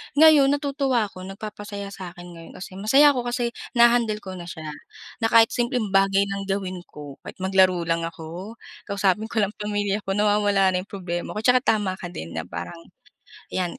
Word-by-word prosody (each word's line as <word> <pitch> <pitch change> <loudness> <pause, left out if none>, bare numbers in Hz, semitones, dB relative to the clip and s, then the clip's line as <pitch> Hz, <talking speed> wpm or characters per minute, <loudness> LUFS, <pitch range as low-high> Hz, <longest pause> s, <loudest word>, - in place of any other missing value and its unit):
Ngayon 300 -2 +7
natutuwa 275 -4 0
ako, 185 0 -10
nagpapasaya 205 0 -7
sa 185 -3 -8
'kin 175 0 -11
ngayon 165 -1 -12
kasi 185 0 -9
masaya 270 +8 +6
ako 250 -3 -3
kasi 240 -1 -1 0.2
naha-handle 235 -3 +4
ko 190 - -7
na 175 -1 -8
siya, 160 -2 -7 0.5
na 225 - +2
kahit 225 0 +5
simpleng 240 -4 -1
bagay 195 0 +4
lang 195 0 -4
gawin 190 -2 -2
ko, 145 -2 -11
kahit - - -8
maglaro 185 -2 +3
lang 165 0 -1
ako, 170 +7 -8 0.3
kausapin 200 +1 +1
ko 220 -2 0
lang 200 - -1
pamilya 205 -1 -1
ko, 195 - 0
nawawala 205 -2 +3
na 180 - 0
yung 190 - -8
problema 175 -3 -5
ko. 215 - -3
Tsaka 250 +1 +5
tama 205 -6 0
ka 175 - -5
din 85 - -8
na 80 0 -4
parang 85 0 -7 0.8
yan, 180 -2 -2
200 Hz, 185 wpm, -24 LUFS, 180-225 Hz, 0.8 s, Ngayon